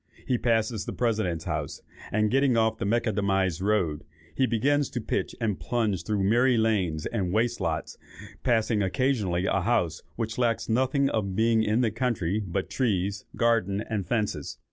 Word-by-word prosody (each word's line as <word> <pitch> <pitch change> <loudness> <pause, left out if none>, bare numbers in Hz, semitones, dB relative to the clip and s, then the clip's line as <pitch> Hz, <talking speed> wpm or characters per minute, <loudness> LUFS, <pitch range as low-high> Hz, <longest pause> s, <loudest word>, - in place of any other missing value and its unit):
He 125 -2 0
passes 115 -2 0
the - - -4
President's 105 -9 0
House, 75 -4 -4 0.3
and 110 0 +1
getting 135 -2 +3
off 110 0 +2
the - - -2
Macadamized 100 -5 +1
road, 95 -8 0 0.3
begins 135 +3 +2
to 125 - -3
pitch 110 - -2
and 105 -8 -1
plunge 105 +3 -1
through 105 -3 0
miry 120 +5 +3
lanes 95 -9 +1
and 95 -6 -2
waste 115 +3 0
lots, 80 -3 -3 0.4
passing 115 -3 +1
occasionally 100 -4 0
a 95 - +1
house 90 -6 0
which 115 0 -3
lacks 115 -2 +1
nothing 130 +4 +2
of 100 -4 -1
being 115 +1 +3
in 110 +2 +2
the 115 -3 +1
country 110 -5 -1
but 95 0 -3
trees, 100 -5 -1
garden, 110 -4 +1
and 105 -5 -3
fences. 110 0 -2
110 Hz, 160 wpm, -27 LUFS, 95-120 Hz, 0.4 s, getting